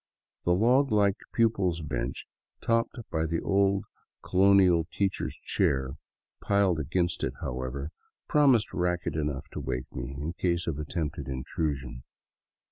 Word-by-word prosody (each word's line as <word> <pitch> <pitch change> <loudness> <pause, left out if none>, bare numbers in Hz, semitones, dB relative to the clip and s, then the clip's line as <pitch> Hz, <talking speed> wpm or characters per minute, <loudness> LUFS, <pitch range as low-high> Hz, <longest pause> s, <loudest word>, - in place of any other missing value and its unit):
The 90 - +4
log 125 +6 +3
like 100 -1 +3
pupils' 100 -7 +1
bench, 70 -2 -3 0.3
topped 115 +2 0
by 80 0 0
the 85 +1 -1
old 100 -1 +2 0.4
colonial 95 -3 +4
teacher's 100 -2 -1
chair, 65 0 0 0.5
piled 100 -5 +2
against 85 +3 -1
it, - - -1
however, 65 +4 -4 0.4
promised 135 -7 +4
racket 90 -1 -1
enough 75 -1 -2
to - - -6
wake 65 -3 -4
me 65 +1 -5
in 80 +4 -3
case 85 -1 0
of 75 -3 -2
attempted 75 -2 -3
intrusion. 65 -1 -3
85 Hz, 125 wpm, -28 LUFS, 70-100 Hz, 0.5 s, The